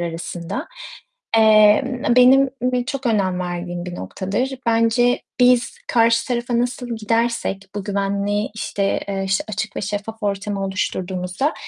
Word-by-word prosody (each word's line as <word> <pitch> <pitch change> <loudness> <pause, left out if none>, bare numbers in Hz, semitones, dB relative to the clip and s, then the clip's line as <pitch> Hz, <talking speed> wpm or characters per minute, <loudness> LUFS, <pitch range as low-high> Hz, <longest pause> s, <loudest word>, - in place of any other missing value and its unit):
arasında. 170 - -5 0.7
Emm, 220 +4 +5
benim 260 +2 +6 0.4
çok 270 0 -4
önem 190 -5 +1
verdiğim 175 0 -4
bir 175 - -5
noktadır. 200 - -3
Bence 230 +2 +2 0.2
biz 245 -1 +3
karşı 230 -1 +3
tarafa 240 -1 -1
nasıl 245 -1 -2
gidersek 225 -2 -1
bu 205 -2 -4
güvenli, 200 +1 -1
işte, 200 -2 -1
eee, 195 -1 -2
işte 190 0 0
açık 215 +1 -4
ve - - -2
şeffaf 210 +3 -5
ortamı 200 0 -2
oluşturduğumuzda, 185 - -2
215 Hz, 125 wpm, -21 LUFS, 195-240 Hz, 0.7 s, benim